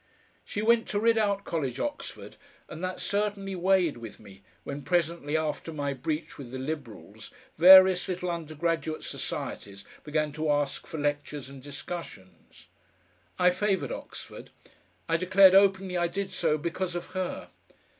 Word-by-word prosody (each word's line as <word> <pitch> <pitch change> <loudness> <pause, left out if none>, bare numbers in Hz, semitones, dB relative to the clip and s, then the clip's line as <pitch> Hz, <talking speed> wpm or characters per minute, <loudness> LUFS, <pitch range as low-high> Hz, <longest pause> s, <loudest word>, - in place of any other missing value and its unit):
She 205 - -4
went 230 0 +3
to 205 - -1
Ridout 215 -3 +2
College, 135 -9 -3
Oxford, 295 - -5 0.3
and 155 +3 -9
that 185 0 -3
certainly 200 -1 -2
weighed 180 -5 +2
with 115 -2 -10
me 100 -2 -15 0.2
when 140 +1 -6
presently 170 -2 0
after 155 +1 -3
my 145 -2 -2
breach 155 +4 -4
with 130 -4 -8
the 130 - -6
Liberals 130 -7 -7 0.3
various 185 +1 +8
little 180 -1 -2
undergraduate 160 -1 -3
societies 100 -1 -6 0.2
began 150 0 -1
to 155 +1 -2
ask 145 -2 0
for 160 - -6
lectures 145 -1 -3
and 135 -1 -11
discussions. 140 - -9 0.7
I 180 0 +5
favoured 190 - 0
Oxford. - - -9 0.6
I 165 - +2
declared 185 +1 +6
openly 195 -1 +4
I 175 0 +2
did 195 +3 -4
so 155 -3 +1
because 170 +3 -3
of 175 - -4
her. 185 -1 -4
165 Hz, 145 wpm, -28 LUFS, 145-185 Hz, 0.7 s, various